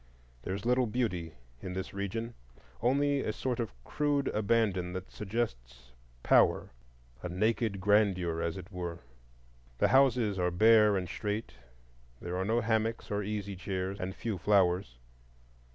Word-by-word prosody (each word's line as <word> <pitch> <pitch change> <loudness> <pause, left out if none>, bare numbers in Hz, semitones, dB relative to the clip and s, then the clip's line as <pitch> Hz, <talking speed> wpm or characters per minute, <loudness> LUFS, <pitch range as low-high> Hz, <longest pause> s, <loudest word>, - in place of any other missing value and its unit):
There 95 +9 -3
is 100 +2 -7
little 125 0 +3
beauty 95 -9 -2 0.3
in 90 - -5
this 95 +1 -5
region, 115 +4 -3 0.5
only 140 +3 +2
a 110 - -1
sort 125 +3 -3
of 115 - -2
crude 145 - 0
abandon 100 -4 +1
that 95 0 -6
suggests 65 - -4 0.3
power,—a - - 0
naked 110 +2 0
grandeur, 95 -5 +2
as 85 +2 -2
it 90 -1 -9
were. 85 -2 -5 0.8
The - - +3
houses 125 -7 +3
are 90 0 +2
bare 105 +2 +5
and 90 -1 -3
straight; 105 +5 -4 0.7
there 90 +1 -5
are 95 +1 -1
no 115 +3 +1
hammocks 110 0 -1
or 105 0 0
easy 100 -1 -4
chairs, 95 +1 -3
and 95 +1 -4
few 110 -5 -3
flowers. 90 -8 +2
100 Hz, 140 wpm, -31 LUFS, 90-115 Hz, 0.8 s, bare